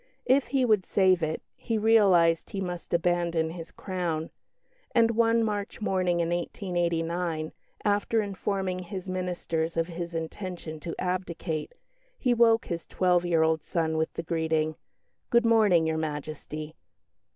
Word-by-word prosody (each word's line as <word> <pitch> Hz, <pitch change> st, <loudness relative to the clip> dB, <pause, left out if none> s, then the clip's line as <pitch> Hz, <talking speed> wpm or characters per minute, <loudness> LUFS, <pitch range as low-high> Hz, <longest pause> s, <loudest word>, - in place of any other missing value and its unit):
If 265 Hz, +1 st, +3 dB
he 265 Hz, -2 st, +2 dB
would 215 Hz, -5 st, +3 dB
save 185 Hz, -2 st, +3 dB
it, 160 Hz, 0 st, -2 dB
he 225 Hz, -, -2 dB
realised 195 Hz, -7 st, +4 dB
he 195 Hz, -, -4 dB
must 180 Hz, -2 st, -5 dB
abandon 170 Hz, -1 st, +1 dB
his 165 Hz, -1 st, -8 dB
crown; 175 Hz, -4 st, -3 dB, 0.6 s
and 230 Hz, -1 st, +5 dB
one 230 Hz, 0 st, +3 dB
March 205 Hz, -2 st, -3 dB
morning 185 Hz, -5 st, +1 dB
in 165 Hz, -, 0 dB
1889, 170 Hz, -2 st, -1 dB, 0.3 s
after 205 Hz, +2 st, +2 dB
informing 195 Hz, -2 st, -2 dB
his 185 Hz, +1 st, -6 dB
ministers 175 Hz, -3 st, -2 dB
of 165 Hz, -, +2 dB
his 170 Hz, 0 st, -6 dB
intention 165 Hz, -1 st, -5 dB
to 165 Hz, +2 st, -5 dB
abdicate, 180 Hz, -, -3 dB, 0.4 s
he 250 Hz, -, +1 dB
awoke 230 Hz, -1 st, +4 dB
his 170 Hz, -1 st, -5 dB
twelve 180 Hz, -1 st, +2 dB
year 165 Hz, -2 st, +3 dB
old 160 Hz, -1 st, +2 dB
son 160 Hz, 0 st, -1 dB
with 160 Hz, 0 st, 0 dB
the 165 Hz, -, -4 dB
greeting, 160 Hz, -1 st, 0 dB, 0.5 s
"Good 235 Hz, 0 st, +4 dB
morning, 210 Hz, -8 st, +5 dB
Your 160 Hz, 0 st, 0 dB
Majesty!" 155 Hz, 0 st, -5 dB
175 Hz, 140 wpm, -28 LUFS, 165-200 Hz, 0.6 s, and